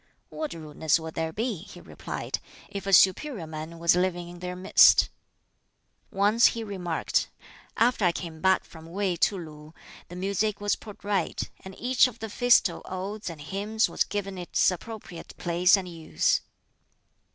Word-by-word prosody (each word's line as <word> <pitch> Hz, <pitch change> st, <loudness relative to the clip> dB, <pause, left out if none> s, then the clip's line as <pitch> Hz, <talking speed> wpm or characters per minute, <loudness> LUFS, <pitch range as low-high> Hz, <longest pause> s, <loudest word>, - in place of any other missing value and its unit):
"What 310 Hz, -, -5 dB
rudeness 155 Hz, 0 st, 0 dB
would 160 Hz, 0 st, -7 dB
there 160 Hz, 0 st, -2 dB
be," 220 Hz, +3 st, -2 dB
he 175 Hz, -, -12 dB
replied, -, -, -5 dB, 0.3 s
"if 200 Hz, -1 st, -6 dB
a -, -, 0 dB
'superior 195 Hz, -, +4 dB
man' 155 Hz, +1 st, -7 dB
was 170 Hz, +1 st, +3 dB
living 180 Hz, -1 st, 0 dB
in 175 Hz, 0 st, -11 dB
their 180 Hz, 0 st, -5 dB
midst?" 185 Hz, +2 st, +6 dB, 1.0 s
Once 205 Hz, +4 st, +4 dB
he 230 Hz, -, -2 dB
remarked, 180 Hz, -6 st, -1 dB, 0.5 s
"After 235 Hz, -3 st, +3 dB
I 175 Hz, -, +5 dB
came 165 Hz, -2 st, -7 dB
back 190 Hz, 0 st, +3 dB
from 160 Hz, -1 st, -13 dB
Wei 190 Hz, +1 st, -1 dB
to 195 Hz, +4 st, +2 dB
Lu 155 Hz, -2 st, -10 dB, 0.3 s
the 175 Hz, -, -10 dB
music 200 Hz, +3 st, -1 dB
was 205 Hz, 0 st, +1 dB
put 210 Hz, -2 st, -12 dB
right, 200 Hz, -4 st, -1 dB, 0.2 s
and 190 Hz, 0 st, -9 dB
each 255 Hz, +1 st, +4 dB
of 240 Hz, -2 st, -9 dB
the 220 Hz, -1 st, -6 dB
Festal 245 Hz, +3 st, +3 dB
Odes 195 Hz, +3 st, -5 dB
and 165 Hz, -3 st, -9 dB
Hymns 205 Hz, +7 st, 0 dB
was -, -, +1 dB
given 195 Hz, -2 st, -4 dB
its 175 Hz, +1 st, +2 dB
appropriate 185 Hz, -2 st, -9 dB
place 175 Hz, +3 st, +4 dB
and 190 Hz, -2 st, -5 dB
use." 160 Hz, -, 0 dB
185 Hz, 165 wpm, -27 LUFS, 170-205 Hz, 1.0 s, midst